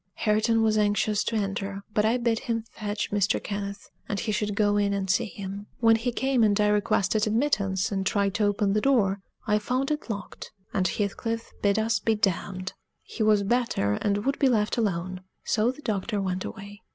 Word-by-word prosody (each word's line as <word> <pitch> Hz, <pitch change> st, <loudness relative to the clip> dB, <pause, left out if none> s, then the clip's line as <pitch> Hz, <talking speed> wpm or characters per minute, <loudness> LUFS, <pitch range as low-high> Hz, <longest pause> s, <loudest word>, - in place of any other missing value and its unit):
Hareton 220 Hz, +1 st, +2 dB
was 215 Hz, -1 st, +3 dB
anxious 210 Hz, 0 st, +2 dB
to 230 Hz, -, -1 dB
enter, 195 Hz, -1 st, -2 dB
but 210 Hz, 0 st, +2 dB
I 225 Hz, +3 st, +3 dB
bid 235 Hz, -2 st, +1 dB
him 230 Hz, -1 st, -2 dB
fetch 205 Hz, -1 st, -3 dB
Mr. 200 Hz, -1 st, +2 dB
Kenneth, 200 Hz, -1 st, -5 dB, 0.2 s
and 200 Hz, -, -1 dB
he 220 Hz, -, -2 dB
should 210 Hz, -1 st, -1 dB
go 205 Hz, -1 st, +2 dB
in 205 Hz, -1 st, +2 dB
and 195 Hz, -1 st, -2 dB
see 215 Hz, +5 st, +2 dB
him. 200 Hz, 0 st, -7 dB
When 225 Hz, -1 st, +5 dB
he 235 Hz, +2 st, -1 dB
came, 265 Hz, +1 st, +1 dB
and 210 Hz, -1 st, +3 dB
I 210 Hz, 0 st, +4 dB
requested 210 Hz, +1 st, +2 dB
admittance 210 Hz, -6 st, +1 dB
and 195 Hz, -1 st, -1 dB
tried 200 Hz, 0 st, +1 dB
to 210 Hz, -, +1 dB
open 205 Hz, -1 st, +1 dB
the 210 Hz, -, +2 dB
door, 205 Hz, -8 st, +2 dB, 0.2 s
I 210 Hz, -1 st, +2 dB
found 255 Hz, +6 st, -1 dB
it 300 Hz, -4 st, -3 dB
locked; 200 Hz, -3 st, -6 dB, 0.2 s
and 185 Hz, -1 st, +2 dB
Heathcliff 225 Hz, +4 st, -2 dB
bid 200 Hz, 0 st, +2 dB
us 220 Hz, +1 st, +1 dB
be 225 Hz, -, +1 dB
damned. 190 Hz, -2 st, -1 dB, 0.3 s
He -, -, -7 dB
was 215 Hz, -2 st, +4 dB
better, 230 Hz, -, +1 dB
and 205 Hz, 0 st, 0 dB
would 275 Hz, +1 st, 0 dB
be 270 Hz, -, +4 dB
left 215 Hz, -3 st, +1 dB
alone; 185 Hz, -4 st, -1 dB, 0.2 s
so 220 Hz, +1 st, +2 dB
the 265 Hz, +4 st, -6 dB
doctor 210 Hz, 0 st, -1 dB
went 185 Hz, -1 st, -2 dB
away. 205 Hz, 0 st, -9 dB
210 Hz, 200 wpm, -26 LUFS, 200-225 Hz, 0.3 s, When